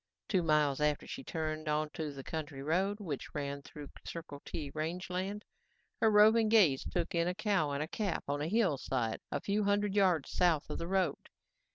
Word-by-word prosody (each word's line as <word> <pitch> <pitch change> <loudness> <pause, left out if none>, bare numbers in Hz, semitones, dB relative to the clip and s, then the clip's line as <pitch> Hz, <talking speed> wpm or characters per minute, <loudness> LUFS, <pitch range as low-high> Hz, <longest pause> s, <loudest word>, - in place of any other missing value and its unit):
Two 190 -4 +2
miles 150 -3 +2
after 150 -1 +1
she 265 - -7
turned 155 -5 -3
onto 150 0 -1
the 135 -1 -8
county 145 -3 -5
road, 190 +7 +1
which 155 -9 -5
ran 140 -1 -3
through 145 0 -10
Circle 155 -4 -7
T 145 -4 -5
range 170 +4 -3
land, 195 +3 -3 0.6
her 220 - +6
roving 215 +1 +6
gaze 185 -12 +5
took 175 -1 -2
in 170 0 +2
a 180 - -1
cow 200 -7 +1
and 145 +2 -3
calf 200 -6 -1
on 145 +1 -1
a 150 - -1
hillside 140 - 0
a - - 0
few 205 +1 0
hundred 205 0 +1
yards 185 -7 +2
south 170 -5 +2
of - - -3
the 170 - -3
road. 185 -5 0
165 Hz, 185 wpm, -33 LUFS, 150-195 Hz, 0.6 s, her